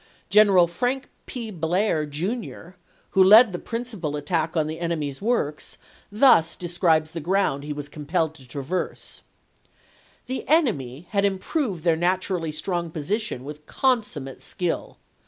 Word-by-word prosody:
General 200 -4 +6
Frank 245 +10 -2 0.2
P. 230 -4 -5
Blair, 165 -2 0
Jr., 175 - -4 0.4
who 190 - +5
led 215 +4 +8
the 175 - -4
principal 220 -11 -4
at 145 - -7
tack 165 -2 0
on 155 - +2
the 155 +1 -5
enemy's 155 -4 -3
works, 200 -10 -1 0.3
thus 205 - +5
describes 165 -3 +1
the 165 - -5
ground 170 -4 0
he 150 - -5
was 145 -1 -5
compelled 160 +2 -2
to 135 -5 -16
traverse: 145 +8 -4 0.5
" - - -32
The 260 +1 -4
enemy 180 - +1
had 200 -1 +1
im 200 -1 +1
proved 200 - -2
their 170 -2 +3
naturally 175 -1 0
strong 170 +2 -2
position 160 - -2
with 150 +2 -9
con 255 -3 +2
summate 140 -10 -8
skill. 180 -3 -3
175 Hz, 150 wpm, -24 LUFS, 155-205 Hz, 0.5 s, led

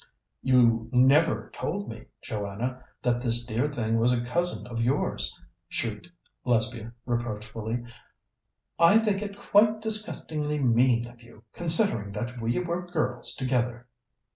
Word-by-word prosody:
"You 115 -3 +3
never 135 +6 +4
told 200 +4 -3
me, 110 -1 -8 0.2
Joanna, 115 +4 -4 0.2
that 120 -1 +1
this 120 -1 -1
dear 120 +4 0
thing 115 -5 -1
was 120 +2 +4
a 120 -1 0
cousin 175 +8 0
of 115 -1 -4
yours," 125 +5 0 0.3
shrieked 110 +6 -3 0.4
Lesbia 115 -1 0
reproachfully. 115 -1 -3 1.0
"I 170 +6 +7
think 210 -3 +1
it 200 -1 -5
quite 215 +2 +4
disgustingly 160 -9 -1
mean 120 -2 +3
of 120 0 -14
you, 115 -2 -17
considering 165 - +1
that 120 +3 -5
we 115 +1 0
were 180 0 -2
girls 140 -8 0
together." 125 -2 -1
125 Hz, 130 wpm, -27 LUFS, 115-160 Hz, 1.0 s, I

